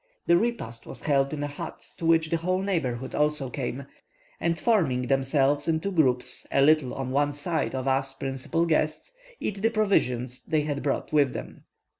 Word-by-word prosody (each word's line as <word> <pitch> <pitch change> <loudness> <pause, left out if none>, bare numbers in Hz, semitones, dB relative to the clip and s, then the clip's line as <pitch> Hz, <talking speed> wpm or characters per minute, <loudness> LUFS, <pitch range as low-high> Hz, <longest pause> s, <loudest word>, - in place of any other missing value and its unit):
The 170 - +5
repast 175 - -2
was - - -7
held 140 -2 +2
in 150 -1 -3
a - - -1
hut, 145 - -8
to 165 - -2
which 160 -1 +3
the 165 - +2
whole 185 +3 0
neighbourhood 130 -10 -2
also 150 -3 +1
came, 130 0 -4 0.5
and 170 -1 0
forming 165 - +2
themselves 135 +3 +1
into 165 +4 0
groups 130 -8 +1
a 135 - +4
little 150 -3 +3
on 130 -1 -3
one 145 +2 +1
side 145 0 -2
of 130 0 -3
us 135 0 +1
principal 135 +5 -1
guests, 155 - 0 0.3
eat 200 -2 -3
the 225 - +3
provisions 130 - 0
they 155 -1 +1
had 145 -1 -2
brought 140 +2 -2
with 145 -4 +4
them. - - -8
145 Hz, 180 wpm, -27 LUFS, 135-165 Hz, 0.5 s, The